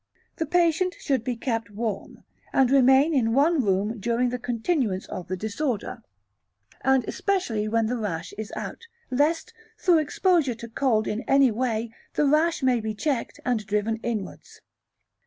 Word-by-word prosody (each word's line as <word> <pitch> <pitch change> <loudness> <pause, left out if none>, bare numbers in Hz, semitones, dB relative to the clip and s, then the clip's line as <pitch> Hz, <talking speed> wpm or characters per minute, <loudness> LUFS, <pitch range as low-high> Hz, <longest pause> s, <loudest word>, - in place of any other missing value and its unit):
The 320 - -2
patient 350 +2 +2
should 265 -6 0
be 250 0 -2
kept 230 -3 -2
warm, 210 -1 -5 0.3
and 265 -2 +3
remain 270 +3 +5
in 230 -4 +2
one 295 +1 +3
room 205 +3 0
during 235 +4 +1
the 250 +1 -3
continuance 235 - -1
of 180 - -6
the 185 - -3
disorder, 220 +3 -3 0.8
and 265 -1 +3
especially 245 - -1
while 225 +1 +1
the 245 +3 -1
rash 170 -7 -4
is 215 -1 -6
out, 465 - -7 0.2
lest, 295 +6 +1 0.2
through 350 -5 +4
exposure 310 -3 +1
to 235 +1 -9
cold 225 -2 +1
in 215 +2 -2
any 275 -2 +5
way, 230 -1 -2 0.2
the 295 - +2
rash 305 +2 +2
may 255 -2 +3
be 215 0 -3
checked 265 +1 -2
and 245 -4 0
driven 210 +2 0
inwards. 225 -3 -6
245 Hz, 155 wpm, -25 LUFS, 220-285 Hz, 0.8 s, remain